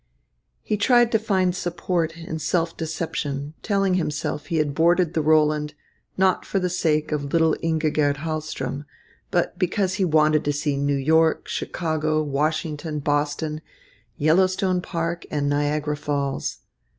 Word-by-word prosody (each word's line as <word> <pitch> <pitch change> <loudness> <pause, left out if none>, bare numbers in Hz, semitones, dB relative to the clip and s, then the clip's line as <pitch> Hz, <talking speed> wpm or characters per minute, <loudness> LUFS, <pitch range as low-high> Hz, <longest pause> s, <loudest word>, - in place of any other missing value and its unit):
He 210 - -1
tried 240 +2 +4
to 220 - +3
find 190 -5 +1
support 170 -2 -2
in 165 -1 -5
self 165 +2 0
deception, 155 -3 -3
telling 195 -3 +1
himself 150 -4 -2
he 165 - -1
had 150 -2 +1
boarded 170 +2 +3
the 160 - +1
Roland, 150 -1 +2 0.4
not 190 0 +2
for - - -2
the 180 -2 0
sake 155 -3 0
of 145 -2 -2
little 160 -1 +3
Ingigerd 155 -3 +1
Hahlström, 150 -3 -4 0.4
but 175 0 0
because 185 +1 +1
he - - +4
wanted 155 -2 +3
to 145 - +1
see 145 0 -1
New 140 0 0
York, 160 +4 +2
Chicago, 155 -2 -1
Washington, 150 +1 -2
Boston, 145 +1 -1 0.6
Yellowstone 185 +4 +2
Park, 170 -1 -3
and 145 -1 -1
Niagara 145 +1 0
Falls. 140 -2 -3
155 Hz, 140 wpm, -23 LUFS, 150-175 Hz, 0.6 s, tried